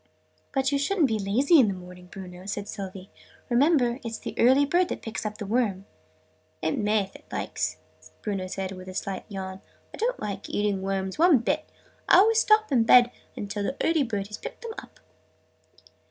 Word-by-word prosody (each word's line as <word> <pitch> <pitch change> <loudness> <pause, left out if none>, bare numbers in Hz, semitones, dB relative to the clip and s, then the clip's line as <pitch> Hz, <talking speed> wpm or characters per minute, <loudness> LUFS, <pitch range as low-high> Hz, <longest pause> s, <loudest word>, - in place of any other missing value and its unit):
"But 270 0 +1
you 280 - +1
shouldn't 320 +1 +2
be 220 -3 -1
lazy 255 - +4
in 245 - +6
the 195 - -1
morning, 180 0 -12
Bruno," 180 -1 -10
said 205 0 -4
Sylvie. 190 -2 -7 0.4
"Remember, 250 -1 +3
it's 230 -1 -4
the - - -6
early 265 +4 +5
bird 350 +5 +2
that - - -5
picks 225 -1 -4
up 210 - -7
the 210 - -5
worm!" 205 -3 0 0.7
"It 160 - -1
may, 210 0 +2
if 195 - -13
it - - -14
likes!" - - -2 0.5
Bruno 195 -3 -2
said 190 0 -4
with 185 -1 -9
a 185 - -9
slight 195 -1 -4
yawn. 190 -1 -6 0.3
"I - - -8
don't - - -1
like 200 -1 -5
eating 205 -2 0
worms, 190 +3 -3
one 340 -3 +6
bit. 235 - -1 0.4
I - - +8
always 440 +4 +5
stop 430 -3 +4
in 250 -4 +4
bed 245 +1 +7 0.4
till 205 0 -3
the 265 +7 -2
early 325 -2 +3
bird 205 -6 -2
has 210 - -7
picked - - -8
them 460 -1 -5
up!" - - -17
215 Hz, 195 wpm, -26 LUFS, 195-275 Hz, 0.7 s, I